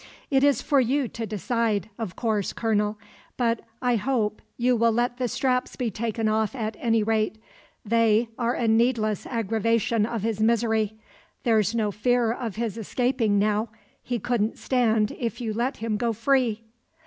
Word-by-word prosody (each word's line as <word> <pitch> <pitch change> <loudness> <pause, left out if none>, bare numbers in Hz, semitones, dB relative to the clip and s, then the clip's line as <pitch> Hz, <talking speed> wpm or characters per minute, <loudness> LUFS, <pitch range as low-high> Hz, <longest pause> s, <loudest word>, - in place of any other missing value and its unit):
"It 270 0 +3
is 285 -1 +3
for 285 -2 +3
you 265 +2 +1
to 230 -1 -5
decide, 215 -1 -1
of 210 -6 -4
course, 215 -4 -1
colonel; 210 -2 0 0.4
but 235 -2 +1 0.2
I 245 -1 +3
hope 220 -2 -1 0.2
you 250 +1 +3
will 230 0 +3
let 240 +2 0
the 250 -1 0
straps 250 +1 0
be 245 -4 -2
taken 225 +1 -2
off 220 +3 0
at 220 -3 -3
any 225 -2 +2
rate. 220 0 +1 0.5
They 230 +1 +3
are 240 0 0
a 235 - 0
needless 225 -2 +2
aggravation 230 -1 +1
of 230 -4 -3
his 225 -2 -1
misery. 220 -1 +2 0.5
There's 220 -2 +2
no 215 -3 +1
fear 235 +2 +1
of 230 -3 -4
his 230 -1 -3
escaping 225 -1 +1
now. 210 +2 +1 0.3
He 245 - -2
couldn't 230 -1 -1
stand 225 -4 +1
if 235 0 -3
you 225 -3 -2
let 245 +5 -1
him 225 -2 -2
go 235 0 0
free." 230 -1 +1
230 Hz, 165 wpm, -25 LUFS, 215-240 Hz, 0.5 s, It